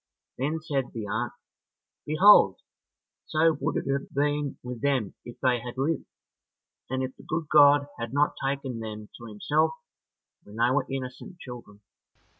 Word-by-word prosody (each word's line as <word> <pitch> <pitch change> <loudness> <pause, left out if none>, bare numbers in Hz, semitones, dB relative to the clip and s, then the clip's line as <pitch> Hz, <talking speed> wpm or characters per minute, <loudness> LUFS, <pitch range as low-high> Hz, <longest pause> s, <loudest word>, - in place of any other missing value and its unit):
Then 150 +5 -1
said 140 -5 -2
the 110 -2 -4
aunt, 110 +4 -2 0.7
"Behold, 185 +8 +6 0.7
so 160 0 +3
would - - 0
it - - -2
have 140 - -3
been 145 0 0
with 125 -1 -6
them 135 -8 0
if 120 - -11
they 125 -2 +3
had 120 +1 -8
lived, 145 +3 0 0.8
and 130 +1 -1
if 130 0 -5
the - - -13
good 160 +1 -2
God 145 -1 +7
had 115 -1 -4
not 145 +2 +2
taken 135 -3 -2
them 110 -1 -7
to 120 - -10
himself 150 +9 +1 0.7
when 105 - -14
they 120 +2 +3
were 135 0 +1
innocent 135 +6 -6
children." 120 -8 -11
135 Hz, 155 wpm, -27 LUFS, 120-145 Hz, 0.8 s, God